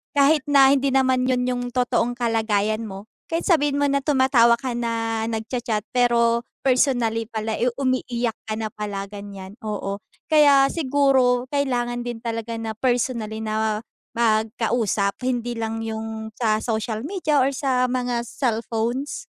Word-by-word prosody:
Kahit 285 +2 +4
na 275 -1 +6
hindi 275 0 +1
naman 260 -1 +2
yun 250 -1 +1
yung 250 -1 -1
totoong 245 -1 0
kalagayan 220 -2 0
mo 195 -1 -8 0.2
kahit 330 +1 -2
sabihin 290 -5 +2
mo 285 - +2
na 280 0 +1
tumatawa 260 -5 +4
ka 250 0 -4
na 230 -1 -2
nag-cha-chat 220 -1 -3
pero 235 -1 +3 0.2
personally 245 -4 +2
pala, 220 0 -3
eh, 245 - +3
umiiyak 250 -3 -1 0.2
ka 215 - -2
na 215 -1 -4
pala 205 -2 -4
ganyan, 200 -1 -9
oo. 205 -1 -4 0.2
Kaya 290 -3 +6
siguro 265 -4 +2
kailangan 245 -4 0
din 240 -1 -5
talaga 230 0 -3
na 225 -1 -4
personally 235 -2 -1
na 220 0 -2 0.3
magkausap 220 -2 +1
hindi 245 -1 -1
lang 225 -1 -3
yung 220 0 -5
sa 215 -2 +1
social 220 +1 -3
media 310 -4 0
or 270 +1 +3
sa 260 -2 +1
mga 245 -1 -1
cellphones. 235 +2 -2
235 Hz, 145 wpm, -23 LUFS, 220-260 Hz, 0.3 s, na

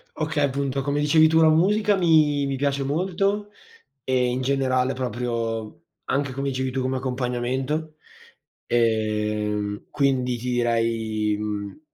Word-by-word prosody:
Okay, 155 -1 -1
appunto, 140 0 -1
come 140 +1 -1
dicevi 155 +2 +5
tu, 160 +1 +3
la 160 -1 +6
musica 205 +6 +3
mi 155 -5 +3
mi 140 -1 -2
piace 140 0 0
molto 195 +7 -1 0.5
e 130 -1 +1
in 125 - -2
generale 130 -1 +1
proprio 115 -3 -3 0.2
anche, 140 0 -1
come 140 +2 -3
dicevi 130 -1 -2
tu, 130 - -1
come 130 +1 -1
accompagnamento, 130 +4 -2 0.7
ehm, 105 -2 0
quindi 130 -3 +1
ti 125 +2 -4
direi, 115 -3 0
mhmm, 105 +1 -5
130 Hz, 130 wpm, -24 LUFS, 115-145 Hz, 0.7 s, la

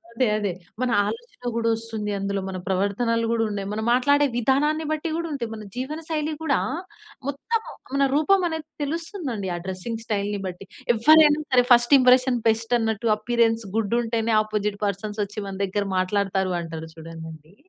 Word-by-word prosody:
అదే, 255 - +2
అదే 205 -2 -1 0.3
మన 255 - +1 0.2
ఆలోచన 460 - -7
కూడా 230 0 +1
వస్తుందందులో. 210 -3 -3
మన 185 - -4
ప్రవర్తనలు 225 +5 +1
కూడా 230 -1 +2
ఉన్నాయి. 200 -1 -4
మనం 220 +1 -2
మాట్లాడే 285 +3 +4
విధానాన్ని 295 +6 +2
బట్టి 310 +1 -1
కూడా 335 0 -2
ఉంటాయి. 240 -6 -3
మన 215 -1 -7
జీవన 265 +5 -4
శైలి 310 0 -1
కూడా, 285 -4 +2 0.7
మొత్తం 440 - -1 0.3
మన 275 0 +3
రూపం 370 +6 +4
అనేది 320 -2 -4 0.2
తెలుస్తుందండి. 295 - -4
ఆ - - -3
డ్రెసింగ్ 190 +5 -4
స్టైల్‌ని 205 -1 -1
బట్టి. 180 +1 -7 0.3
ఎవ్వరైనా 300 +5 +6
సరే 250 -1 +6
ఫస్ట్ 240 +3 +7
ఇంప్రెషన్ 255 0 +5
బెస్ట్ 225 +2 +1
అన్నట్టు. 225 0 -1
అపియరెన్స్ 230 0 +1
గుడుంటేనే, 225 +1 0
అపోజిట్ 210 -1 -2
పర్సన్సొచ్చి 205 +1 -3
మన 195 - -5
దగ్గర 200 +1 -2
మాట్లాడతారు 190 0 0
అంటారు 160 -1 -7
చూడండి. 160 0 -10
230 Hz, 150 wpm, -24 LUFS, 200-275 Hz, 0.7 s, ఫస్ట్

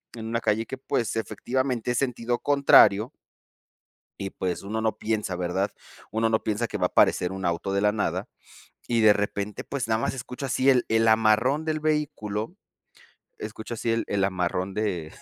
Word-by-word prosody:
en 110 -1 -7
una 115 0 -1
calle 110 +1 +1
que, 130 - -6
pues, 120 -4 -1
efectivamente 125 +1 -2
es 120 - -1
sentido 120 -2 -1
contrario 130 -5 +5 1.1
y, 95 -1 -4
pues, 90 -1 -3
uno 110 +3 -3
no 110 -1 0
piensa, 105 -4 -2
¿verdad? 90 +3 -1 0.4
Uno 115 +1 +1
no 110 - +1
piensa 110 +2 -1
que - - -4
va - - +1
a - - +4
aparecer 90 +1 +3
un 95 -1 -5
auto 85 +3 -1
de 100 - +1
la 105 0 +4
nada. 105 - -2 0.6
Y 115 -2 +1
de 105 -1 +7
repente, 105 0 -3
pues, 135 -4 -4
nada 110 0 +1
más - - -1
escucho 125 +1 -6
así 130 +1 +2
el 125 -2 +4
el 115 0 +3
amarrón 110 +7 +3
del 155 -1 -1
vehículo 145 -9 -2 0.8
escucho 110 +2 -6
así 115 0 -1
el 115 - +1
el 100 -1 0
amarrón 95 0 -1
de 90 -7 -2
110 Hz, 180 wpm, -26 LUFS, 100-120 Hz, 1.1 s, de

